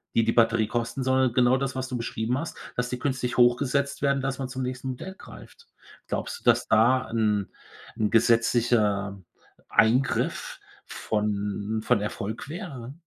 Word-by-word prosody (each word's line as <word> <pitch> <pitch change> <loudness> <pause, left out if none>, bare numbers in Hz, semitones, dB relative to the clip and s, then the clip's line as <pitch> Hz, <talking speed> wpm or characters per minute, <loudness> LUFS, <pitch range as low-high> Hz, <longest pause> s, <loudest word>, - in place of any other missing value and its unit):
die 115 - +4
die 115 - +2
Batterie 115 -2 +3
kosten, 120 +3 -2
sondern 130 -1 +2
genau 125 0 +4
das, 135 0 -2
was 130 0 -3
du 125 - -4
beschrieben 115 +1 -2
hast, 160 +3 -5 0.2
dass 125 0 -1
die 125 - -4
künstlich 130 -3 -2
hochgesetzt 140 +3 +2
werden, 140 -1 +2
dass 135 0 -3
man 130 -1 -3
zum 130 +1 -5
nächsten 130 +1 -4
Modell 190 +9 -6
greift. 465 - -14 0.4
Glaubst 475 - -4
du, - - -28
dass - - +3
da 120 +4 +3
'n 105 -3 0 0.5
'n 105 -1 +1
gesetzlicher 115 -4 +2 0.5
Eingriff 125 +5 +1 0.3
von 105 0 -2
von 120 -5 +2
Erfolg 110 +4 -5
wäre? 140 - -7
120 Hz, 155 wpm, -26 LUFS, 110-130 Hz, 0.5 s, die